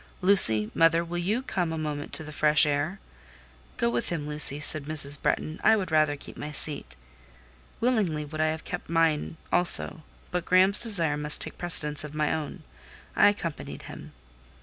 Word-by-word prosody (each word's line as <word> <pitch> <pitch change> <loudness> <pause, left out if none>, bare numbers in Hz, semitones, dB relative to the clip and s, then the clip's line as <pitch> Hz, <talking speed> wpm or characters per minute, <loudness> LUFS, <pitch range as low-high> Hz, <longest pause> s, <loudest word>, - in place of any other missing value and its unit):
"Lucy—mother—will 165 - +3
you 210 +9 -2
come 180 -9 -3
a 160 - -5
moment 150 -2 -6
to - - 0
the 150 - -10
fresh 150 0 +2
air?" 150 +6 -3 0.8
"Go - - -1
with 120 0 -3
him, 150 -4 -5
Lucy," 150 -1 +3
said 150 -1 +4
Mrs. 145 -2 +5
Bretton. 155 +2 -3
"I 220 - +4
would 190 -5 -5
rather 155 -2 +1
keep 145 - -13
my 150 - -7
seat." 150 -1 -3 0.8
Willingly 200 -12 -1
would 155 +1 -6
I 155 - +1
have 160 0 -5
kept 175 - -8
mine 165 -1 -1
also, 175 -2 +3 0.3
but 180 -1 -3
Graham's 185 +3 +2
desire 170 -10 +3
must 150 0 -2
take - - -3
precedence 150 -4 +1
of 150 0 -10
my 150 -1 -1
own; 155 -3 -7 0.5
I - - +5
accompanied 175 -6 -7
him. - - -12
155 Hz, 170 wpm, -25 LUFS, 150-175 Hz, 0.8 s, Mrs